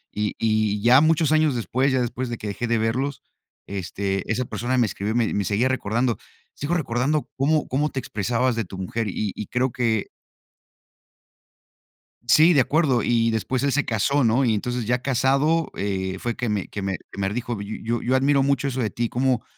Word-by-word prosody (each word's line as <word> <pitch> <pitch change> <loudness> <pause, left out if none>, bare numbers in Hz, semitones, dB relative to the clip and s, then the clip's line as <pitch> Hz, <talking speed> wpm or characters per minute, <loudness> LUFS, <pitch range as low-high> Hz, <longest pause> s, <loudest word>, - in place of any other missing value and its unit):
Y 105 0 -1
y 110 -2 +1
ya 125 +3 +7
muchos 160 0 +3
años 155 -4 +3
después, 130 +4 0
ya 130 - +2
después 125 +1 -3
de 120 - -4
que - - -9
dejé 110 +4 -3
de 115 - +1
verlos, 125 +6 -1 0.5
este, 95 0 -3
esa 125 +2 0
persona 125 +3 -2
me 120 - +4
escribió, 105 +2 -3
me 120 -2 +1
me 100 - 0
seguía 110 +7 +1
recordando. 120 -1 0 0.4
Sigo 150 +5 -2
recordando 140 0 0
cómo 150 +3 +1
cómo 145 +4 0
te 135 - -3
expresabas 120 +3 -1
de 115 - -1
tu 95 - -9
mujer 105 +4 -3
y 100 +1 -2
y 105 - -6
creo 125 0 0
que. 115 -4 0 2.2
Sí, 155 +9 +6
de 140 - +5
acuerdo, 135 -2 +2
y 115 -1 +2
después 125 +4 -1
él 140 -2 +1
se 145 0 +2
casó, 130 +5 +1
¿no?, 120 +4 +3
y 115 - +2
entonces 120 +2 -2
ya 125 +2 0
casado, 140 +5 +2
eh, 95 -1 -2
fue 120 -1 -3
que 125 - -3
me 105 -3 -1
que 100 - -5
me 95 -1 -2 0.2
que - - -9
me 95 0 0
dijo: 120 0 -3
"Y 105 +2 -6
Yo 120 +1 -1
yo 130 +2 +1
admiro 140 +1 +3
mucho 140 0 +1
eso 130 0 -4
de 110 - 0
ti. 115 +3 -2
Como 125 -1 0
120 Hz, 200 wpm, -23 LUFS, 110-135 Hz, 2.2 s, ya